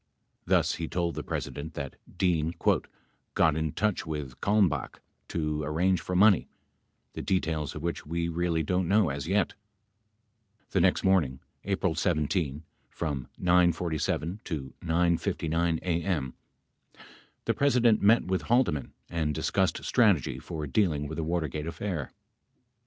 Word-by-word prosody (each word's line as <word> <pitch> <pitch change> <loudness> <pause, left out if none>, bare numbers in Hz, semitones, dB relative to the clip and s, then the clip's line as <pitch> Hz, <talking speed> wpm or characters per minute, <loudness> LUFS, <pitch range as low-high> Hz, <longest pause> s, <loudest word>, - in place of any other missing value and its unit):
Thus - - +3
he 80 - -3
told 85 -1 -1
the - - -4
President 80 +3 -5
that 70 -2 -5 0.2
Dean 85 -2 +1 0.8
"got 80 -3 +4
in 80 -1 -1
touch 105 -2 0
with 75 -5 -6
Kalmbaoh 95 -10 +2 0.3
to 75 -2 -2
arrange 85 +5 +1
for 90 - -4
money, 100 0 +5 0.7
the - - -5
details 80 -5 -1
of 75 - -6
which 85 0 -2
we 85 +2 -2
really 85 -1 0
don't 90 +3 0
know 100 -2 +4
as 70 +2 -4
yet." 95 0 +1 1.1
42 - - -39
The 95 - +2
next 90 +1 +3
morning, 80 -9 +2 0.3
April 95 -3 0
17, 75 -3 0 0.3
from 70 -6 -3
9 90 -1 +4
:47 85 +3 -2
to 70 -6 -5
9 85 0 +2
:59 80 +1 0
a.m., 85 -6 -1 1.1
the - - +2
President 125 -5 +3
met 110 +3 +5
with 95 0 0
Haldeman 120 - +2
and 80 -3 -1
discussed - - 0
strategy 105 - +2
for 80 -3 -5
dealing 75 -1 +1
with 80 - -6
the 80 - -1
Watergate 80 -2 -2
affair. 85 -4 -4
85 Hz, 140 wpm, -28 LUFS, 75-95 Hz, 1.1 s, money